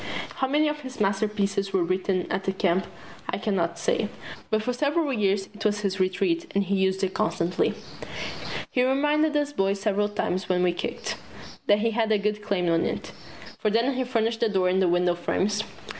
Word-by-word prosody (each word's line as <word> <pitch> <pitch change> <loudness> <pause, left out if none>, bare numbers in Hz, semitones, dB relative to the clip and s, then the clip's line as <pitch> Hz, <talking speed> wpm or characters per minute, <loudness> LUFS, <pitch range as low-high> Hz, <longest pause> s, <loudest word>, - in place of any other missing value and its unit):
How 265 - +1
many 300 +3 +3
of 300 0 -1
his 260 -3 -9
masterpieces 200 -1 0
were 190 -2 +3
written 185 +1 0
at 190 +1 -1
the 190 - +1
Camp 190 -2 +1 0.4
I - - 0
can 210 -3 -1
not 170 -2 0
say, 215 - 0 0.4
but 215 -1 +1
for 250 - 0
several 290 +3 +1
years 200 -3 +1
it 215 +1 -8
was 210 -1 +1
his 195 -1 -1
Retreat 335 - 0
and 200 - +3
he 200 +1 0
used 190 0 +1
it 190 -1 0
constantly. 180 -5 0 1.0
He 250 - +2
reminded 295 +3 +2
us 290 0 0
boys 195 -3 +1
several 205 0 +1
times 190 -2 -2
when 180 -1 +2
we 180 -1 +3
kicked, - - -4 0.5
that 205 0 +5
he 230 +1 +2
had 220 -1 +1
a 215 - +5
good 210 +1 -1
claim 200 -4 0
on 165 0 +3
it - - -3 0.5
for 215 - +1
didn't 230 +5 +2
he 260 0 0
furnish 230 -2 0
the 230 -1 +1
door 190 -3 +2
and 190 +1 +2
the 185 - +4
window 175 0 +3
frames? 200 +4 0
205 Hz, 205 wpm, -26 LUFS, 190-235 Hz, 1.0 s, that